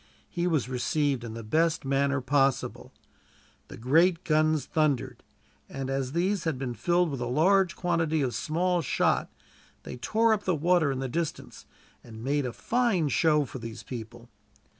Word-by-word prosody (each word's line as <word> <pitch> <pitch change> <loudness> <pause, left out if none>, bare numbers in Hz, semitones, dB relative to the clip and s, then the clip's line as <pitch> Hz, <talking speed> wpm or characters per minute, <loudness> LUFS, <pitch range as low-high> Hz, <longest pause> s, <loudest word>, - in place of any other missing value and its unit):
He 175 0 -1
was 155 -8 0
received 135 +1 -1
in 115 -1 -7
the 115 - -7
best 160 +6 +1
manner 140 0 +1
possible. 135 0 0 0.8
The - - -10
great 165 +8 +3
guns 155 -1 +2
thundered, 150 -5 -1 0.5
and 135 -1 -5
as 135 -1 -2
these 185 +3 0
had 160 -5 -1
been 125 -2 -4
filled 175 +8 +1
with 135 - -4
a 120 - -2
large 185 +7 +3
quantity 165 -4 0
of 125 -2 -1
small 175 +3 0
shot, - - +1 0.5
they - - -8
tore 220 - +2
up 210 -1 -2
the 185 - +1
water 165 -1 +2
in 135 -1 -3
the 135 - -2
distance, 145 - -5 0.4
and 110 -1 -11
made 140 0 0
a - - -4
fine 220 - 0
show 150 -1 +3
for 130 - -8
these 115 -1 -8
people. 120 -1 -9
150 Hz, 165 wpm, -27 LUFS, 130-170 Hz, 0.8 s, great